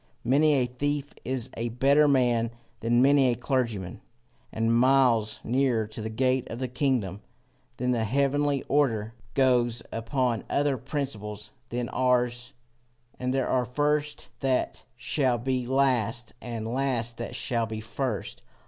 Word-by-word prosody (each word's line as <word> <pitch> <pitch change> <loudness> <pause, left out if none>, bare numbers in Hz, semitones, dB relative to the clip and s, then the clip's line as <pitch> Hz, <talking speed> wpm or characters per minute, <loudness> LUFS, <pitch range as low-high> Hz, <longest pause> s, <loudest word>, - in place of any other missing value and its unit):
Many 145 +5 +4
a 130 -2 +2
thief 145 +3 -3
is 130 -1 -3
a 120 +1 -2
better 140 +5 +4
man 120 -4 +3 0.3
than 120 +2 +3
many 140 -1 +5
a 120 - +1
clergyman, 115 -8 -2 0.5
and 115 +1 +1
miles 125 -3 +3
nearer 125 -3 +1
to 110 +1 -7
the 110 - -4
gate 130 +3 +1
of 115 - -5
the 130 +1 -2
kingdom. 125 - -1 0.6
The 125 -2 0
heavenly 140 +4 +1
order 115 -7 +1 0.2
goes 125 -3 +2
upon 120 0 -1
other 145 -1 +1
principles 105 -6 -5 0.2
than 120 0 -2
ours, 125 -1 +1 0.7
and 125 0 -1
there 135 -1 0
are 130 -1 +2
first 145 +2 -1
that 130 -1 -1
shall 130 0 +1
be 125 +1 -2
last, 125 -4 +1
and 115 -2 -5
last 120 -2 -1
that 115 - -5
shall 115 -2 -1
be 110 -1 -5
first. 115 0 -4
125 Hz, 140 wpm, -27 LUFS, 115-135 Hz, 0.7 s, many